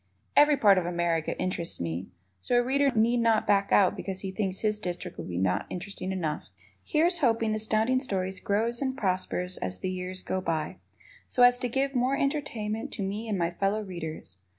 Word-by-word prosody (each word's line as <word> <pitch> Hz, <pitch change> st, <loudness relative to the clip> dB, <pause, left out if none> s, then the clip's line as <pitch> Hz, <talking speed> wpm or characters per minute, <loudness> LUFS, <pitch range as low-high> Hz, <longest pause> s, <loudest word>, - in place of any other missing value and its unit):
Every 295 Hz, 0 st, +6 dB
part 200 Hz, -6 st, +6 dB
of 175 Hz, -, -3 dB
America 170 Hz, -2 st, -1 dB
interests 185 Hz, -2 st, 0 dB
me, 85 Hz, +2 st, -3 dB, 0.3 s
so 245 Hz, -, +1 dB
a 245 Hz, -, +4 dB
Reader 275 Hz, +2 st, +2 dB
need 230 Hz, +2 st, +3 dB
not 230 Hz, -2 st, +3 dB
back 200 Hz, -1 st, +2 dB
out 195 Hz, -3 st, +5 dB
because 190 Hz, -1 st, -5 dB
he 190 Hz, -, -4 dB
thinks 190 Hz, -1 st, -2 dB
his 215 Hz, -1 st, 0 dB
district 180 Hz, -4 st, -5 dB
would -, -, -6 dB
not 90 Hz, +1 st, 0 dB
be -, -, -4 dB
interesting 190 Hz, 0 st, -5 dB
enough. 160 Hz, -5 st, -2 dB, 0.4 s
Here's 340 Hz, +3 st, +2 dB
hoping 225 Hz, -5 st, +2 dB
Astounding 220 Hz, +4 st, +2 dB
Stories 190 Hz, -7 st, -2 dB
grows 230 Hz, +4 st, 0 dB
and 265 Hz, -1 st, -1 dB
prospers 185 Hz, -3 st, -1 dB
as 90 Hz, 0 st, -4 dB
the 185 Hz, -, -2 dB
years 185 Hz, 0 st, -5 dB
go 185 Hz, -, -2 dB
by, 160 Hz, -3 st, -2 dB, 0.5 s
so 250 Hz, -, +3 dB
as 245 Hz, 0 st, +6 dB
to 250 Hz, -1 st, -2 dB
give 270 Hz, +3 st, 0 dB
more 255 Hz, +2 st, +1 dB
entertainment 235 Hz, -7 st, -2 dB
to 200 Hz, -, -3 dB
me 210 Hz, +4 st, -4 dB
and 205 Hz, -, 0 dB
my 170 Hz, -1 st, 0 dB
fellow 200 Hz, +4 st, 0 dB
readers. 160 Hz, -, -7 dB
200 Hz, 195 wpm, -28 LUFS, 180-240 Hz, 0.5 s, Every